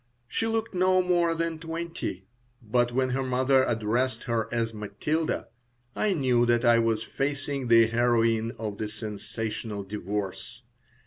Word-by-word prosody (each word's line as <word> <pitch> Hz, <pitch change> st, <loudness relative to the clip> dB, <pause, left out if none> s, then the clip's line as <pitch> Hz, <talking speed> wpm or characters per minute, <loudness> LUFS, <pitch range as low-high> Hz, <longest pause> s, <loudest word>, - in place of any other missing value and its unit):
She 225 Hz, -, -1 dB
looked 225 Hz, -1 st, -1 dB
no 185 Hz, 0 st, +3 dB
more 175 Hz, -2 st, +2 dB
than 165 Hz, -1 st, -2 dB
twenty, 165 Hz, -, -5 dB, 0.3 s
but 120 Hz, +1 st, +1 dB
when 130 Hz, +1 st, +1 dB
her 135 Hz, +1 st, 0 dB
mother 130 Hz, +1 st, +3 dB
addressed 120 Hz, +3 st, 0 dB
her 115 Hz, -2 st, -1 dB
as 115 Hz, -1 st, -1 dB
Matilda 110 Hz, +10 st, -2 dB, 0.5 s
I 205 Hz, -3 st, +1 dB
knew 125 Hz, -5 st, +3 dB
that 120 Hz, +1 st, +2 dB
I 120 Hz, -1 st, +6 dB
was 115 Hz, -1 st, +1 dB
facing 140 Hz, -1 st, -2 dB
the 115 Hz, -1 st, +7 dB
heroine 115 Hz, -1 st, +2 dB
of 105 Hz, -2 st, -5 dB
the 110 Hz, -, -2 dB
sensational 110 Hz, 0 st, -5 dB
divorce. 100 Hz, -1 st, -5 dB
120 Hz, 140 wpm, -27 LUFS, 110-145 Hz, 0.5 s, the